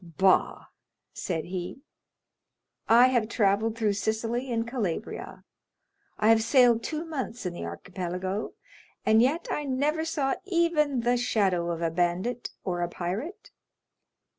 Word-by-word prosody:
"Bah!" 180 +3 +2 0.5
said 165 -4 -3
he, 180 +8 -6 1.1
"I 240 +3 +7
have 235 -4 +1
travelled 215 +1 +1
through 215 -3 +1
Sicily 225 +5 -2
and 230 0 -1
Calabria—I 235 - -6
have 225 0 +6
sailed 240 -1 +4
two 310 +6 -4
months 265 - -5
in 180 - -2
the 175 - -6
Archipelago, 180 - -4 0.5
and 220 +1 +5
yet 285 +8 +1
I 295 - -2
never 290 +4 0
saw 280 -4 0
even 335 -8 +1
the 245 +1 +2
shadow 190 -8 +1
of 170 0 -3
a 165 - +1
bandit 180 +8 -1
or 175 -2 -2
a 175 - -1
pirate." 190 - -5
225 Hz, 130 wpm, -27 LUFS, 185-265 Hz, 1.1 s, I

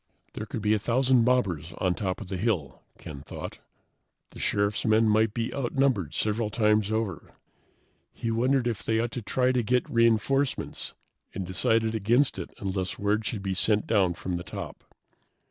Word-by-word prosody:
There 110 - -6
could 110 - -5
be 105 0 +3
a 110 - +2
thousand 125 +2 +3
mobbers 90 - +1
on 90 -1 +1
top 95 -1 -3
of - - -7
the 95 0 -4
hill, 90 - -1 0.2
Ken 70 -3 -9
thought. - - -8 0.7
The - - -12
Sheriff's 100 +1 0
men 110 0 +4
might 110 0 +3
be 115 +1 -3
outnumbered 130 - 0
several 105 +1 0
times 105 -1 +2
over. 110 -6 -3 0.8
He 115 - -3
wondered 125 +3 +2
if 115 -3 -1
they 110 0 0
ought 120 0 -1
to 120 - -4
try 125 +4 +1
to 125 -1 +1
get 125 +2 +1
reinforcements, 115 +4 +1 0.4
and 95 - -3
decided 110 +5 +1
against 115 +6 +2
it - - -6
unless 95 -2 -3
word 105 +2 0
should 105 -4 -3
be 95 -1 -1
sent 105 +3 +2
down 95 -6 +2
from 90 0 -3
the 85 - -6
top. - - -8
110 Hz, 175 wpm, -27 LUFS, 100-120 Hz, 0.8 s, men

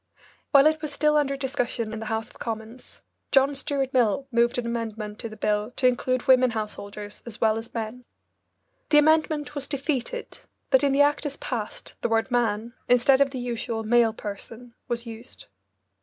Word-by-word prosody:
While 280 -1 +6
it 310 0 +3
was 305 -2 -3
still 300 +1 +2
under 275 -2 +1
discussion 245 -5 -2
in 220 - -4
the 220 - -6
House 220 0 -2
of - - -18
Commons, 225 +2 -7 0.3
John 275 +1 +4
Stuart 275 -1 -2
Mill 245 0 +2
moved 235 0 +2
an 245 - -2
amendment 220 -2 -4
to 230 - -5
the 215 - -11
bill 210 +1 0
to 255 - -1
include 250 0 0
women 255 -1 +5
householders 210 -2 -6
as 230 -1 -6
well 220 -1 +3
as 225 +1 -6
men. 230 +2 -5 0.8
The 300 - +5
amendment 310 -1 +3
was 285 -2 -2
defeated, 285 - -3 0.3
but 265 - +5
in 280 - +3
the 275 +1 +4
act 290 +1 +1
as 285 - -7
passed 225 -5 -5
the - - 0
word 225 +3 +1
"man," 235 -1 0 0.2
instead 250 +2 +5
of 280 - +4
the 265 - -6
usual 235 -2 -3
"male 230 0 +4
person," 225 +3 -8
was 235 0 -3
used. 230 +2 -10
240 Hz, 185 wpm, -25 LUFS, 225-275 Hz, 0.8 s, While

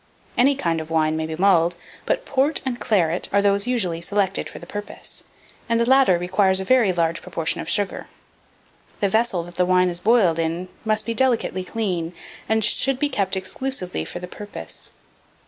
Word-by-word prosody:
Any 275 +3 +4
kind 165 -10 -1
of 160 - -9
wine 155 -1 +1
may 160 0 -2
be 160 - -4
mulled, 175 -2 +3 0.3
but - - 0
port 280 +3 +1
and 245 -2 -2
claret 175 -5 +1
are 200 - +3
those 200 +1 +2
usually 185 -10 0
selected 195 +1 -1
for - - -10
the - - -10
purpose; 205 0 -7 0.5
and 230 0 +2
the 235 - +3
latter 265 -8 +5
requires 190 +2 +2
a 190 - -3
very 240 -4 +4
large 170 -1 0
proportion 165 0 -2
of - - -6
sugar. 205 -2 -1 0.9
The 200 - +1
vessel 220 -4 +1
that 175 +1 -11
the 180 - +3
wine 180 0 +4
is 175 0 -2
boiled 195 -6 +3
in 165 +3 -2 0.2
must 215 0 +1
be 230 - -1
delicately 235 -7 +1
clean, 180 -5 -2 0.4
and 220 -1 +3
should 270 +4 +3
be 290 +2 +1
kept 195 -7 0
exclusively 190 0 -3
for - - -7
the 180 0 -6
purpose. 205 +3 -7
190 Hz, 185 wpm, -22 LUFS, 175-230 Hz, 0.9 s, latter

